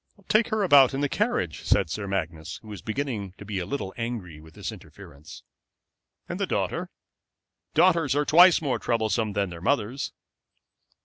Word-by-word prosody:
"Take 215 Hz, +1 st, +3 dB
her 215 Hz, -1 st, 0 dB
about 140 Hz, -7 st, +6 dB
in 135 Hz, -, -2 dB
the 145 Hz, -, +2 dB
carriage," 140 Hz, -, -1 dB
said 80 Hz, -, +1 dB
Sir 100 Hz, +3 st, -4 dB
Magnus, 85 Hz, -5 st, -4 dB
who 110 Hz, -, -12 dB
was 105 Hz, -, -8 dB
beginning 110 Hz, -6 st, -4 dB
to 100 Hz, -, -10 dB
be 100 Hz, -2 st, -3 dB
a 90 Hz, -, -4 dB
little 100 Hz, -5 st, -4 dB
angry 110 Hz, -10 st, -5 dB
with 80 Hz, 0 st, -16 dB
this -, -, -5 dB
interference. 75 Hz, +2 st, -13 dB, 0.8 s
"And -, -, -5 dB
the -, -, 0 dB
daughter? -, -, -2 dB, 0.9 s
Daughters 165 Hz, -5 st, +4 dB
are 145 Hz, 0 st, +1 dB
twice 175 Hz, +2 st, +6 dB
more 135 Hz, -4 st, 0 dB
troublesome 110 Hz, -2 st, 0 dB
than 100 Hz, -2 st, -1 dB
their 85 Hz, -1 st, -9 dB
mothers." 125 Hz, +3 st, -1 dB
110 Hz, 170 wpm, -26 LUFS, 95-145 Hz, 0.9 s, about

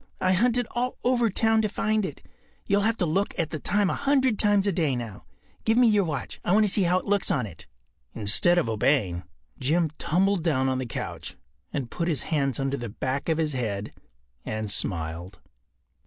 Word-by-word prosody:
I 185 Hz, -, +2 dB
hunted 240 Hz, +6 st, +2 dB
all 250 Hz, +1 st, -2 dB
over 240 Hz, -2 st, +2 dB
town 220 Hz, +2 st, +2 dB
to 215 Hz, -, 0 dB
find 215 Hz, -1 st, 0 dB
it. 145 Hz, -, -10 dB, 0.4 s
You’ll 200 Hz, +1 st, +2 dB
have 225 Hz, +2 st, +1 dB
to 180 Hz, -, +1 dB
look 190 Hz, +6 st, -1 dB
at 165 Hz, -4 st, -1 dB
the 155 Hz, -, -4 dB
time 205 Hz, +6 st, +1 dB
a -, -, 0 dB
hundred 265 Hz, -5 st, +1 dB
times 205 Hz, -2 st, +3 dB
a 200 Hz, -, +2 dB
day 160 Hz, -7 st, +1 dB
now. 115 Hz, -4 st, -7 dB, 0.4 s
Give 225 Hz, +1 st, +2 dB
me 250 Hz, -, +6 dB
your 205 Hz, -3 st, +3 dB
watch. 150 Hz, -4 st, -4 dB
I 175 Hz, -, +1 dB
want 215 Hz, +1 st, +5 dB
to 205 Hz, -, +3 dB
see 205 Hz, -, +3 dB
how 180 Hz, 0 st, +3 dB
it -, -, -4 dB
looks 205 Hz, -1 st, +1 dB
on 125 Hz, -4 st, +1 dB
it.” 95 Hz, -6 st, -10 dB, 0.5 s
Instead 110 Hz, -, +3 dB
of 175 Hz, -, +2 dB
obeying, 110 Hz, -5 st, +1 dB, 0.4 s
Jim 155 Hz, +4 st, +1 dB
tumbled 190 Hz, +1 st, +1 dB
down 135 Hz, -6 st, +1 dB
on 130 Hz, 0 st, -1 dB
the 130 Hz, -, -3 dB
couch -, -, -6 dB, 0.4 s
and 130 Hz, -5 st, -4 dB
put 170 Hz, -, -2 dB
his 160 Hz, -5 st, 0 dB
hands 140 Hz, -5 st, -1 dB
under 135 Hz, 0 st, -1 dB
the 120 Hz, -3 st, -5 dB
back 130 Hz, +8 st, -3 dB
of 160 Hz, -, +2 dB
his 155 Hz, -2 st, 0 dB
head 105 Hz, -5 st, -3 dB, 0.5 s
and 110 Hz, -1 st, -4 dB
smiled. 85 Hz, -1 st, -3 dB
165 Hz, 205 wpm, -26 LUFS, 130-205 Hz, 0.5 s, me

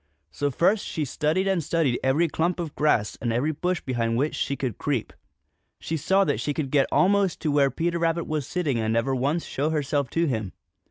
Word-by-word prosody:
So 145 Hz, -, -1 dB
first 185 Hz, -, +2 dB
she 155 Hz, -, -3 dB
studied 155 Hz, +8 st, 0 dB
and 190 Hz, -4 st, +1 dB
studied 150 Hz, -5 st, +1 dB
every 140 Hz, +6 st, +3 dB
clump 170 Hz, +3 st, -1 dB
of 165 Hz, -4 st, -4 dB
grass 115 Hz, -9 st, +1 dB
and 120 Hz, -, 0 dB
every 125 Hz, +7 st, +1 dB
bush 180 Hz, +3 st, -2 dB
behind 115 Hz, -3 st, -1 dB
which 145 Hz, +5 st, 0 dB
she 140 Hz, -, -1 dB
could 130 Hz, -5 st, -4 dB
creep. 140 Hz, -6 st, -2 dB, 0.7 s
She 165 Hz, -, -3 dB
saw 190 Hz, +6 st, +2 dB
that -, -, 0 dB
she 145 Hz, -, -2 dB
could 140 Hz, -4 st, -3 dB
get 140 Hz, -2 st, +3 dB
almost 195 Hz, -1 st, +3 dB
to 155 Hz, -, 0 dB
where 140 Hz, -1 st, +4 dB
Peter 170 Hz, +3 st, -1 dB
Rabbit 165 Hz, 0 st, 0 dB
was 150 Hz, -4 st, -3 dB
sitting 155 Hz, -9 st, -1 dB
and 110 Hz, 0 st, 0 dB
never 115 Hz, +4 st, +1 dB
once 140 Hz, +6 st, 0 dB
show 145 Hz, +3 st, -1 dB
herself 145 Hz, -3 st, -1 dB
to 165 Hz, +6 st, +1 dB
him. 110 Hz, -, -2 dB
150 Hz, 210 wpm, -25 LUFS, 130-170 Hz, 0.7 s, where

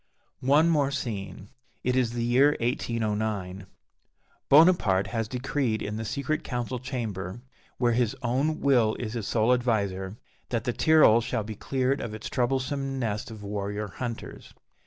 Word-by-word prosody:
One 150 Hz, +4 st, +5 dB
more 150 Hz, -4 st, +2 dB
scene: 105 Hz, -7 st, -5 dB, 0.3 s
it 125 Hz, 0 st, +1 dB
is 125 Hz, -3 st, +1 dB
the 120 Hz, -1 st, -2 dB
year 130 Hz, +5 st, +4 dB
1809. 110 Hz, -6 st, -2 dB, 0.8 s
Bonaparte 140 Hz, -, +5 dB
has 115 Hz, 0 st, -2 dB
decreed 125 Hz, -2 st, -1 dB
in 105 Hz, +1 st, -4 dB
the 110 Hz, -, -4 dB
secret 140 Hz, +7 st, -2 dB
council 125 Hz, 0 st, -3 dB
chamber, 115 Hz, -5 st, -5 dB, 0.3 s
where 120 Hz, -1 st, +2 dB
his 120 Hz, -2 st, +1 dB
own 135 Hz, +6 st, 0 dB
will 120 Hz, -6 st, +3 dB
is 115 Hz, -3 st, -5 dB
his 115 Hz, -5 st, -4 dB
sole 115 Hz, +2 st, +3 dB
adviser, 100 Hz, -5 st, -1 dB, 0.3 s
that 115 Hz, -3 st, -1 dB
the 120 Hz, -, -1 dB
Tyrol 155 Hz, -8 st, +5 dB
shall 120 Hz, -1 st, -2 dB
be 110 Hz, +1 st, -6 dB
cleared 130 Hz, +5 st, -1 dB
of 110 Hz, -2 st, -5 dB
its 110 Hz, -, -6 dB
troublesome 135 Hz, +2 st, -1 dB
nest 110 Hz, -4 st, -2 dB
of 110 Hz, -2 st, -9 dB
warrior 105 Hz, +1 st, -3 dB
hunters. 115 Hz, +3 st, -7 dB
120 Hz, 150 wpm, -27 LUFS, 105-130 Hz, 0.8 s, One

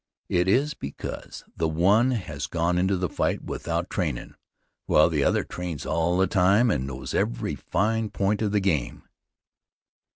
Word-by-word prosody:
It 90 Hz, +1 st, +2 dB
is 140 Hz, +9 st, +2 dB
because 70 Hz, -, -7 dB
the 80 Hz, -, 0 dB
one 100 Hz, +10 st, +3 dB
has 90 Hz, -, -3 dB
gone 85 Hz, +1 st, 0 dB
into 95 Hz, +1 st, +2 dB
the 90 Hz, 0 st, -1 dB
fight -, -, -1 dB
without 85 Hz, +2 st, -3 dB
trainin', 75 Hz, -9 st, -2 dB, 0.5 s
while -, -, +5 dB
the -, -, +1 dB
other -, -, +2 dB
trains 90 Hz, -5 st, -6 dB
all 85 Hz, +2 st, +1 dB
the 95 Hz, -, +4 dB
time 100 Hz, +5 st, +3 dB
and 65 Hz, -5 st, -1 dB
knows 65 Hz, -1 st, -6 dB
every -, -, -1 dB
fine 110 Hz, +3 st, -1 dB
point 100 Hz, +1 st, 0 dB
of 105 Hz, -2 st, 0 dB
the 105 Hz, -1 st, +2 dB
game. 80 Hz, -11 st, -1 dB
90 Hz, 160 wpm, -25 LUFS, 80-100 Hz, 0.5 s, while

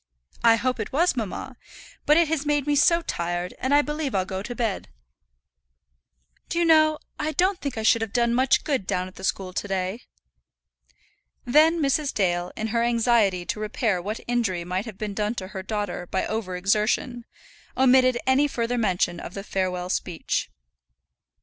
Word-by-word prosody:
"I 230 Hz, -1 st, +7 dB
hope 250 Hz, +2 st, -1 dB
it 215 Hz, -, -4 dB
was, 335 Hz, +4 st, +2 dB
mamma. 240 Hz, +2 st, -5 dB, 0.5 s
But 300 Hz, -, +6 dB
it 335 Hz, -1 st, +4 dB
has 310 Hz, -2 st, -1 dB
made 290 Hz, -2 st, 0 dB
me 295 Hz, -1 st, +1 dB
so 335 Hz, +4 st, +4 dB
tired, 175 Hz, -, -3 dB
and 260 Hz, -, -2 dB
I 290 Hz, +1 st, +5 dB
believe 295 Hz, -4 st, -3 dB
I'll 185 Hz, -1 st, +1 dB
go 190 Hz, 0 st, -4 dB
to 240 Hz, +4 st, -6 dB
bed. 225 Hz, -5 st, -2 dB, 1.6 s
Do -, -, -3 dB
you 345 Hz, -, +3 dB
know 310 Hz, -1 st, +5 dB, 0.2 s
I 310 Hz, -, -1 dB
don't 370 Hz, +2 st, +1 dB
think 280 Hz, -5 st, -4 dB
I 220 Hz, -, -2 dB
should 225 Hz, +1 st, +4 dB
have 225 Hz, -2 st, -3 dB
done 235 Hz, 0 st, +1 dB
much 255 Hz, +2 st, +3 dB
good 270 Hz, -11 st, -1 dB
down 180 Hz, 0 st, -1 dB
at 185 Hz, -, -12 dB
the 190 Hz, -, -12 dB
school 190 Hz, -1 st, -2 dB
to 205 Hz, -, -3 dB
day?" 190 Hz, +3 st, -2 dB, 1.4 s
Then 310 Hz, +6 st, +4 dB
Mrs. 285 Hz, 0 st, 0 dB
Dale, 175 Hz, -2 st, 0 dB
in 220 Hz, +1 st, -3 dB
her 230 Hz, +1 st, 0 dB
anxiety 230 Hz, -6 st, +2 dB
to 210 Hz, -, -3 dB
repair 215 Hz, -3 st, -1 dB
what 210 Hz, +5 st, -4 dB
injury 225 Hz, -8 st, 0 dB
might 185 Hz, +4 st, -3 dB
have 220 Hz, -5 st, -9 dB
been 210 Hz, -1 st, -4 dB
done 210 Hz, +3 st, -1 dB
to 185 Hz, -4 st, -6 dB
her 190 Hz, -2 st, -6 dB
daughter 200 Hz, -3 st, -4 dB
by 190 Hz, -, -1 dB
over 210 Hz, -4 st, -3 dB
exertion, 215 Hz, +5 st, 0 dB, 0.5 s
omitted 255 Hz, -1 st, +5 dB
any 265 Hz, +3 st, +3 dB
further 245 Hz, -2 st, -2 dB
mention 180 Hz, -5 st, 0 dB
of 175 Hz, -, -8 dB
the 195 Hz, -, -5 dB
farewell 185 Hz, -2 st, -2 dB
speech. 175 Hz, -4 st, -2 dB
225 Hz, 180 wpm, -25 LUFS, 190-265 Hz, 1.6 s, I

